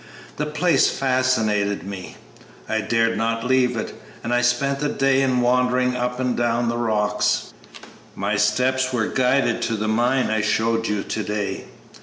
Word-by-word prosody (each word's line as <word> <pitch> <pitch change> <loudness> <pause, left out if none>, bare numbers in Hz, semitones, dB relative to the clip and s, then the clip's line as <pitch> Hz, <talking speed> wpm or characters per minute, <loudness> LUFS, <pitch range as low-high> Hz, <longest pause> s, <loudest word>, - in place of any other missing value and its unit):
The 150 - -2
place 150 0 +2
fascinated 110 -8 0
me; 95 -1 -8 0.5
I 110 0 0
dared 115 +1 +1
not 115 0 -1
leave 125 -1 +2
it, 110 - -4 0.3
and 120 - -2
I 120 - +3
spent 135 +3 +1
the 145 0 -1
day 135 0 +2
in 130 -2 +1
wandering 125 +1 +2
up 125 0 -2
and 125 -1 0
down 120 0 0
the 120 - -2
rocks. 110 -3 0 0.6
My 105 +1 -1
steps 125 +6 +1
were 115 -3 0
guided 125 -1 +1
to 115 - -1
the 110 0 -2
mine 120 +3 +1
I 110 0 +1
showed 115 +2 0
you 105 -1 -1
to 110 - -3
day. 105 -1 -3
120 Hz, 165 wpm, -22 LUFS, 110-130 Hz, 0.6 s, I